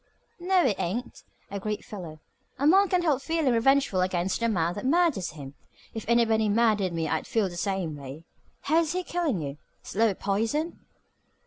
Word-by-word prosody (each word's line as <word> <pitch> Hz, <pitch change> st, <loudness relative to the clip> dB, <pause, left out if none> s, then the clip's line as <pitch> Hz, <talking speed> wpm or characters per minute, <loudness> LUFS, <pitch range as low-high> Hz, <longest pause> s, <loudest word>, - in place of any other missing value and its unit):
"No, 360 Hz, 0 st, +2 dB
it 215 Hz, -7 st, +1 dB
ain't," 235 Hz, +8 st, -3 dB, 0.3 s
agreed 205 Hz, +1 st, -4 dB
Philo. 170 Hz, -7 st, -8 dB, 0.4 s
"A 275 Hz, -, -1 dB
man 385 Hz, +5 st, +5 dB
can't 360 Hz, -1 st, +2 dB
help 290 Hz, -5 st, +2 dB
feeling 320 Hz, -4 st, +1 dB
revengeful 250 Hz, -4 st, +3 dB
against 185 Hz, 0 st, 0 dB
the 230 Hz, 0 st, +1 dB
man 175 Hz, -5 st, 0 dB
that 205 Hz, -, -6 dB
murders 285 Hz, -, +1 dB
him. 140 Hz, -3 st, -9 dB, 0.4 s
If 225 Hz, -, -6 dB
anybody 225 Hz, -2 st, +3 dB
murdered 210 Hz, -3 st, +2 dB
me 165 Hz, -1 st, -2 dB
I'd 160 Hz, +1 st, -2 dB
feel 220 Hz, -4 st, +1 dB
the 175 Hz, -, -9 dB
same 185 Hz, -4 st, -2 dB
way. 140 Hz, +2 st, -9 dB, 0.4 s
How's 320 Hz, +2 st, +1 dB
he 365 Hz, 0 st, -1 dB
killing 320 Hz, -, -1 dB
you? 140 Hz, +1 st, -6 dB, 0.2 s
Slow 220 Hz, -1 st, +1 dB
poison?" 225 Hz, -, -1 dB
220 Hz, 165 wpm, -27 LUFS, 180-285 Hz, 0.4 s, man